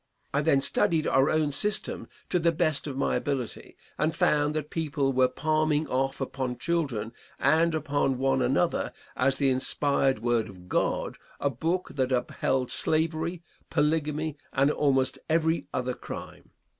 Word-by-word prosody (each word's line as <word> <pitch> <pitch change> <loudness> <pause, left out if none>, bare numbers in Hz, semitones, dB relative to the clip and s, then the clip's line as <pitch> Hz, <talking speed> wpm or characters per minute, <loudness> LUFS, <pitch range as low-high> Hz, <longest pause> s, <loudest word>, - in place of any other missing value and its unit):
I 140 - +2
then 140 -3 +3
studied 160 +3 +2
our 135 +2 +3
own 155 -2 +1
system 205 +8 0 0.2
to 180 - +3
the 170 0 +3
best 155 -3 0
of 135 -2 -5
my - - +1
ability, 130 -9 -3 0.2
and 155 +1 +1
found 150 0 +2
that 150 -1 -3
people 145 -4 0
were 130 0 +4
palming 155 +3 0
off 135 +1 -1
upon 130 -2 -3
children 135 -10 -1 0.2
and 160 +4 +3
upon 145 -3 0
one 135 0 +1
another 135 +8 +1 0.2
as 130 +1 +2
the 135 -2 +2
inspired 135 0 +1
word 115 -1 0
of 90 -2 -13
God - - -1 0.2
a 140 - 0
book 165 +8 -2
that 130 -2 0
upheld 125 0 0
slavery, 160 +2 0 0.3
polygamy 155 0 0
and 140 +2 +3
almost 135 -3 +1
every 160 +1 +1
other 125 0 -1
crime. - - -9
145 Hz, 150 wpm, -27 LUFS, 130-155 Hz, 0.3 s, were